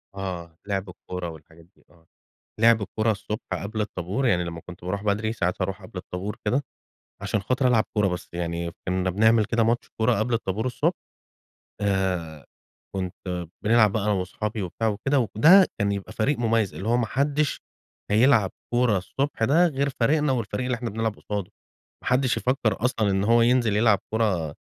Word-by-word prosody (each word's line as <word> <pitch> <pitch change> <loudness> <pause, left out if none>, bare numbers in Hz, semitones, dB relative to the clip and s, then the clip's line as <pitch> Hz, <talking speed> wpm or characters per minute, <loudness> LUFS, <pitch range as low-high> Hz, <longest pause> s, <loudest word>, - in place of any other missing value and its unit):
آه، 85 -4 -6
لِعب 100 -1 -2
الكورة 90 -1 -6
والحاجات 80 +1 -14
دي 90 - -30
آه. 80 -1 -25 0.5
لِعب 115 -2 +5
الكورة 110 +2 0
الصبح 105 +1 -3
قبل 110 +2 -3
الطابور 105 +5 -2
يعني 90 -3 +2
لما 85 -1 -6
كنت 90 +1 -12
باروح 100 +3 -3
بدري 105 +2 0
ساعات 90 -3 -2
أروح 95 +1 -2
قبل 95 -1 -9
الطابور 90 +3 -5
كده، 125 +7 +1 0.6
عشان 100 +1 -1
خاطر 130 +5 +1
العب 115 -3 +4
كورة 105 -2 +2
بس، 90 -1 -4
يعني 85 0 -3 0.2
كنا 95 0 0
بنعمل 110 +3 +4
كده 115 +1 +1
ماتش 115 +2 0
كورة 110 -1 +2
قبل 115 +2 0
الطابور 110 0 -1
الصبح. 125 - +1 0.9
آآ، 90 -7 -1 0.5
كنت 90 -2 -4 0.2
بنلعب 110 -1 +5
بقى 110 0 -1
أنا 105 - +2
وأصحابي 100 +3 -2
وبتاع 105 +5 -2
وكده، 120 +7 +1 0.2
وده 180 - +7
كان 100 0 +1
يبقى 100 -1 -5
فريق 135 +6 +1
مميز 115 -4 +1
اللي 100 - -6
هو 120 - +3
ما 120 - +1
حدش 140 +4 0 0.5
هيلعب 110 -3 +4 0.2
كورة 120 -4 +3
الصبح 135 +6 -2
ده 165 +9 +5
غير 140 -2 -1
فريقنا 150 +3 +3
والفريق 125 +1 -2
اللي 125 - 0
إحنا 120 0 -4
بنلعب 110 0 -2
قصاده، 105 -1 -4 0.5
ما - - -3
حدش 130 0 +2
يفكر 120 -4 0
أصلًا 110 -5 +1
إن 95 0 +1
هو 115 +2 +5
ينزل 120 -3 +3
يلعب 110 -2 +4
كورة 95 -9 0
105 Hz, 175 wpm, -25 LUFS, 95-120 Hz, 0.9 s, وده